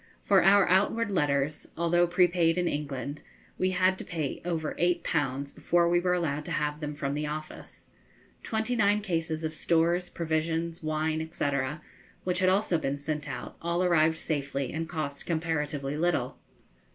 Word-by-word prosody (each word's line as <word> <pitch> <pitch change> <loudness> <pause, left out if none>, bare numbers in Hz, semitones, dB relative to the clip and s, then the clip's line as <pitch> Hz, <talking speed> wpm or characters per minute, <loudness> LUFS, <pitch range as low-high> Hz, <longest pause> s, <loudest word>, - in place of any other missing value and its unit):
For 195 -2 +4
our 195 +1 +6
outward 205 +4 +2
letters, 145 -3 0
although 175 +1 +3
prepaid 175 -1 +3
in 180 -1 +1
England, 145 -1 -3 0.4
we 185 - +2
had 185 0 +2
to - - -5
pay 155 -5 -4
over 165 -3 -2
eight 175 0 +2
pounds 140 -2 -1
before 170 0 +2
we 175 0 +3
were 180 0 +1
allowed 150 -4 -1
to - - -6
have 150 0 -1
them 150 -1 -4
from 140 -1 -2
the 150 +1 -2
office. 155 +1 -8 0.5
Twenty 220 +2 -1
nine 210 -1 +3
cases 165 -5 -2
of 155 0 -2
stores, 170 +2 +1
provisions, 165 +1 -2
wine, 155 +1 -1
&c., - - -2 0.8
which 180 -1 0
had 185 -1 +4
also 190 -3 +2
been 140 -2 -2
sent 150 +1 -4
out, 125 -2 -6
all 170 +2 0
arrived 160 -2 +3
safely, 140 -4 -2
and 160 +1 -3
cost 150 -4 -4
comparatively 150 -4 -1
little. 155 -6 0
160 Hz, 165 wpm, -28 LUFS, 150-175 Hz, 0.8 s, our